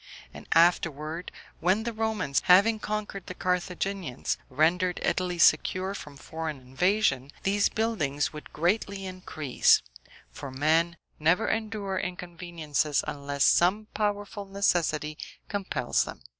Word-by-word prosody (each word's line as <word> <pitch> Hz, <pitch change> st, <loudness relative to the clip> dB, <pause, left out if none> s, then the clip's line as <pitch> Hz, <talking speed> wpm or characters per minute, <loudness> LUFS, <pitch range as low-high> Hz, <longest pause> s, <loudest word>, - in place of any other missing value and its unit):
And -, -, -11 dB
afterward, 165 Hz, -1 st, +2 dB, 0.3 s
when 185 Hz, +6 st, +2 dB
the 235 Hz, 0 st, -3 dB
Romans, 220 Hz, -10 st, 0 dB
having 200 Hz, +5 st, +6 dB
conquered 210 Hz, -3 st, -4 dB
the 185 Hz, -, -6 dB
Carthaginians, 180 Hz, -5 st, -2 dB
rendered 170 Hz, +6 st, +2 dB
Italy 180 Hz, -1 st, 0 dB
secure 185 Hz, +4 st, +3 dB
from 145 Hz, -7 st, -9 dB
foreign 160 Hz, -1 st, -5 dB
invasion, 135 Hz, +1 st, +1 dB
these 200 Hz, +1 st, +2 dB
buildings 165 Hz, -13 st, -1 dB
would 150 Hz, -, -10 dB
greatly 195 Hz, +3 st, 0 dB
increase; 180 Hz, -7 st, +2 dB, 0.5 s
for 135 Hz, -, -7 dB
men 160 Hz, +5 st, +1 dB, 0.2 s
never 165 Hz, +8 st, +3 dB
endure 210 Hz, -3 st, -2 dB
inconveniences 170 Hz, -4 st, -2 dB
unless 140 Hz, -1 st, -1 dB
some 205 Hz, +5 st, +3 dB
powerful 205 Hz, -1 st, -2 dB
necessity 170 Hz, -6 st, 0 dB, 0.3 s
compels 200 Hz, -2 st, 0 dB
them. -, -, -9 dB
180 Hz, 115 wpm, -28 LUFS, 155-200 Hz, 0.5 s, having